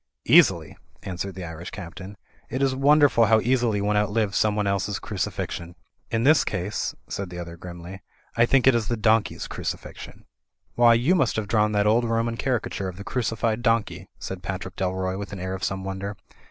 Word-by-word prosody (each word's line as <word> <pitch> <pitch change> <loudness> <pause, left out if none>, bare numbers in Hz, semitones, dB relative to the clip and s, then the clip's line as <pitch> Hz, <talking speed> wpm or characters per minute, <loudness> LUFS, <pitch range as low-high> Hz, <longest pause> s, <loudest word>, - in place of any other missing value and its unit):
"Easily," - - +5 0.3
answered 95 +1 -5
the 95 - -6
Irish 85 +1 -7
Captain. 95 +2 -9 0.3
"It 130 +3 -1
is 135 -1 +2
won 140 +3 +4
derful 140 -6 +5
how 110 +1 +5
easily 120 -3 +1
one 105 +1 +1
outlives 105 0 +1
someone 105 -1 +2
else's 100 +1 -1
cruci 100 -4 -3
fixion." 85 0 -5 0.3
"In 115 0 0
this 150 +3 +5
case," 95 +1 -3
said 100 -2 -4
the 90 - -8
other 85 -1 -7
grimly, 90 +2 -9 0.3
"I 115 0 +4
think 135 0 +3
it 130 - +7
is 115 -3 0
the 120 - -1
donkey's 110 0 +1
crucifixion." - - -7 0.5
"Why, 120 -1 +6
you 125 +10 +3
must 135 -10 +2
have 110 -2 -2
drawn 105 0 +2
that 105 0 +2
old 115 +3 +3
Roman 115 0 0
cari 125 -1 0
cature 95 -1 -4
of 90 - -10
the 100 - -7
crucified 115 -1 -1
donkey," 115 -2 0
said 95 -1 -6
Patrick 95 +1 -5
Dalroy, 95 0 -2
with 100 0 -6
an 95 - -6
air 95 +1 -3
of 95 -1 -6
some 95 +1 -2
wonder. 95 +1 -5
105 Hz, 195 wpm, -25 LUFS, 95-115 Hz, 0.5 s, it